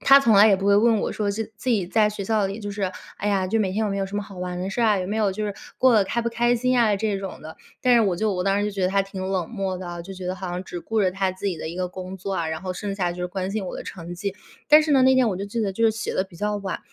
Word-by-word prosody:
她 275 0 +7
从 230 -6 +4
来 205 +2 +8
也 195 - +5
不 195 - -5
会 200 0 +5
问 225 +1 +4
我 - - -2
说， 205 -2 -1
现 220 +2 -3
自 255 - -6
己 205 -7 +1
在 210 +3 +3
学 210 -1 -5
校 215 -1 +1
里 200 +3 -5
就 205 -1 -5
是， 195 -2 -2 0.3
哎 205 - -1
呀， 195 -2 +1
就 225 +4 +1
每 190 -3 0
天 215 +3 0
有 205 - -1
没 195 - -2
有 195 - -1
什 200 - -5
么 205 - -1
好 195 -2 -11
玩 180 0 -4
的 185 +2 -3
事 235 - -2
儿 - - +4
啊， 210 -2 +3
有 180 - -3
没 210 - -2
有 210 -3 +2
就 215 +3 -3
是 205 - -2 0.3
过 255 -1 +5
得 205 -3 +5
开 235 +4 -1
不 235 - 0
开 240 +1 +2
心 255 +1 +1
啊 215 -3 +4
这 205 -1 -1
种 195 -1 -7
的。 160 - -9 0.3
但 250 -1 +5
是 235 - +6
我 200 -5 +2
就 215 +4 0
我 180 -1 -2
当 195 0 +2
时 - - 0
就 210 - -1
觉 195 -2 -3
得 185 - +3
她 195 +1 +2
挺 195 -1 -7
冷 185 -4 -2
漠 195 -5 -2
的， 175 -1 -6
就 195 +3 -9
觉 185 -1 -7
得 185 - -1
好 185 -1 -5
像 180 +1 -3
只 175 -2 -7
顾 225 +3 -1
着 190 -2 +3
她 190 0 -1
自 190 +2 -6
己 185 -4 -1
的 160 - -5
一 170 - -6
个 180 0 -1
工 185 +1 -7
作 195 +1 -5
啊， 170 - -1
然 160 +3 -4
后 185 - -3
剩 200 +2 -4
下 180 -3 0
就 180 - -8
是 - - 0
关 185 +1 -4
心 205 -2 -3
我 - - -5
的 - - -6
成 175 -1 -8
绩。 200 +2 -4 0.3
但 305 +1 +9
是 300 -1 0
呢， 265 - +5
那 260 0 +5
天 255 -3 +4
我 190 - -2
就 195 - -4
记 210 +3 -3
得 200 -3 0
就 230 +4 0
是 225 - +6
写 220 0 -4
得 - - +2
比 185 -3 -16
较 210 +2 -1
晚， 195 -2 -4
195 Hz, 385 characters per minute, -24 LUFS, 185-215 Hz, 0.3 s, 但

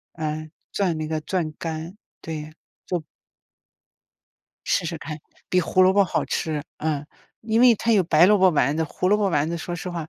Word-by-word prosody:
呃， 155 -1 -3 0.2
攥 185 -5 0
那 155 0 -3
个 155 0 -2
攥 170 -1 -2
干， 165 +3 -5 0.2
对， 155 -1 -6 0.3
做 175 -3 -2 1.6
试 - - +1
试 165 0 -3
看。 150 0 -7 0.3
比 185 - +3
胡 185 +2 +2
萝 185 +1 +6
卜 200 0 +5
好 185 - -1
吃， 155 -2 -2 0.2
嗯。 150 -2 -2 0.4
因 220 0 +1
为 245 -1 +7
它 230 +2 0
有 205 -4 +4
白 165 +1 +5
萝 210 0 +5
卜 185 -1 +5
丸 145 -1 +1
子， 160 - +1
胡 180 +4 -2
萝 210 - +4
卜 210 -1 +1
丸 155 -3 +1
子 170 - -2
说 175 +1 -5
实 180 +2 -5
话 170 -3 -5
165 Hz, 210 characters per minute, -24 LUFS, 155-185 Hz, 1.6 s, 为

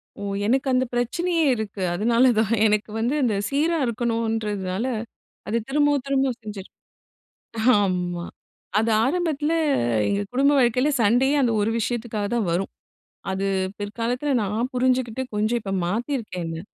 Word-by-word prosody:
ஒ, - - -11 0.2
எனக்கு 265 +5 +1
அந்த 255 +1 +2
பிரச்சனையே 330 +8 0
இருக்கு, 210 -3 -5
அதனால 235 +6 +3
தான் 220 +1 +1
எனக்கு 210 0 +1
வந்து, 240 +5 0
அந்த 220 -4 +1
சீரா 315 +4 +1
இருக்கணும்ன்றதுனால 225 -4 -1 0.6
அது 225 +3 0
திரும்பவும், 290 -1 +2
திரும்பவும் 270 -3 0
செஞ்சிருவே 205 -3 -8 1.1
ஆமா 180 -2 -1 0.6
அது 225 - +1
ஆரம்பத்தில 310 0 0 0.6
எங்க 200 0 0
குடும்ப 280 +3 +3
வாழ்க்கையில 250 +3 +3
சண்டையே 250 +7 +3
அந்த 245 -3 +2
ஒரு 205 - +1
விஷயத்துக்காக 225 -2 -2
தான் 230 -5 0
வரும். 185 +3 -1 0.6
அது 190 +1 -2 0.3
பிற்காலத்தில 235 +7 -2
நான் 220 +6 -2
புரிஞ்சுகிட்டு 255 -1 +1
கொஞ்சம் 215 +3 +1
இப்ப 195 -2 -5
மாத்திருக்கேன் 220 - -3
என்ன. 165 0 -5
235 Hz, 130 wpm, -23 LUFS, 210-260 Hz, 1.1 s, அதனால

